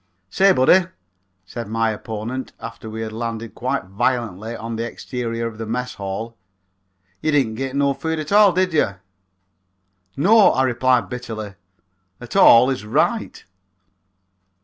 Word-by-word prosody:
"Say, 195 0 +4
buddy," 175 +5 +4 0.6
said 115 +4 -7
my 115 +1 0
opponent, 110 +4 -6
after 115 -1 -8
we 110 +1 -6
had 110 -1 -5
landed 115 -1 -5
quite 130 +1 -2
violently 115 +1 -2
on 115 +1 -6
the 115 - -3
exterior 115 -1 -4
of 115 -1 -6
the 115 - -5
Mess 125 +2 -3
Hall, 100 +4 -6 0.9
"you 155 - 0
didn't 135 -7 +2
git 135 +3 -4
no 140 0 +2
food 160 +4 -3
at 155 +2 -5
all, 205 -1 +6
did 185 0 0
yer?" 100 -11 +1 1.2
"No," 205 +8 +5
I 130 - +2
replied 125 -3 +2
bitterly; 110 -4 -6 0.7
"at 120 - -10
all 120 +3 +7
is 130 -4 -4
right." 105 - -1
120 Hz, 145 wpm, -21 LUFS, 110-135 Hz, 1.2 s, all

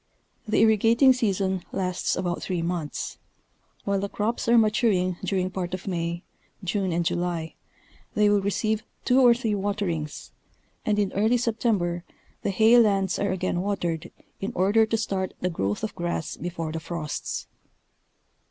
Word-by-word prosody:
The 215 - +2
irrigating 225 +4 +5
season 195 -6 0
lasts 185 -2 -1
about 175 -1 -2
three 180 -3 -2
months. 170 -3 -3 0.7
While 200 -1 +1
the 200 +1 -3
crops 220 +4 -2
are 235 - +6
maturing 210 -5 +2
during 185 -1 0
part 185 -1 -3
of 185 - -10
May, 170 -1 -2 0.4
June 190 0 -1
and 170 0 0
July, 170 -2 -1 0.6
they 210 0 +4
will 205 -1 +4
receive 215 +2 0 0.2
two 255 +1 +5
or 240 -2 +7
three 230 -3 -1
waterings, 195 -7 -3 0.6
and 210 -1 +2
in 205 -2 0
early 220 +5 +3
September 215 -7 0 0.4
the - - -1
hay 220 +5 +6
lands 195 -5 +2
are 200 - 0
again 185 -1 -1
watered 175 -5 -2 0.3
in 195 +4 -3
order 205 +4 +4
to 225 - 0
start 195 -4 -2
the 180 - 0
growth 100 -10 -2
of 215 - -2
grass 175 -2 -3
before 170 -2 -4
the 160 - -3
frosts. 155 -1 -4
195 Hz, 150 wpm, -26 LUFS, 175-215 Hz, 0.7 s, or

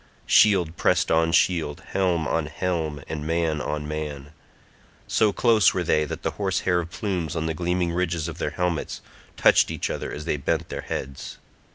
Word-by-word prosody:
Shield 90 -6 +4
pressed - - +2
on 80 0 +3
shield, 80 -4 +1
helm 90 -5 +1
on 80 -1 0
helm, 80 -3 -2
and 75 -2 -4
man 80 -2 0
on 75 0 -3
man; 75 -2 -5 0.7
so 110 -2 +2
close 110 -1 +4
were 90 - 0
they 75 -2 +2
that - - -6
the - - 0
horse 95 -2 0
hair 90 -2 +1
plumes 85 -1 -3
on 80 -1 -1
the 80 - -1
gleaming 90 +1 -1
ridges 85 -2 -1
of 85 - -7
their - - -1
helmets 90 -3 -2 0.4
touched - - +5
each - - -3
other - - -4
as 75 - -6
they 80 - 0
bent 70 - -1
their - - -4
heads. 70 0 -6
80 Hz, 180 wpm, -24 LUFS, 75-90 Hz, 0.7 s, touched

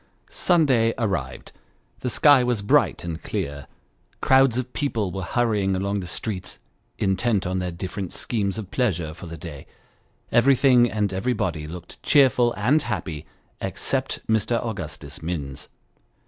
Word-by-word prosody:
Sunday 130 -10 +3
arrived; 95 - -3 0.5
the 125 - -2
sky 140 +2 +5
was 120 -4 0
bright 100 - +2
and 85 -1 -5
clear; 70 -1 -4 0.5
crowds 130 -2 +4
of 125 0 -3
people 115 -10 -1
were 95 - -4
hurrying 105 -2 +1
along 100 +2 -1
the 90 - -6
streets, 95 0 -4 0.4
intent 95 +1 +1
on 95 +1 -1
their 90 -1 -2
different 90 +1 -5
schemes 100 -4 -2
of 100 -4 -7
pleasure 90 -11 0
for 85 +2 -10
the 85 0 -7
day; 75 -3 -9 0.6
everything 125 -1 +5
and 105 -3 -1
everybody 95 -7 -1
looked 85 +2 -10
cheerful 125 -4 +4
and 130 +10 +3
happy 80 - -4 0.3
except - - -2
Mr. 110 +1 +1
Augustus 110 -3 -6
Minns. 75 -5 -5
100 Hz, 135 wpm, -24 LUFS, 90-120 Hz, 0.6 s, sky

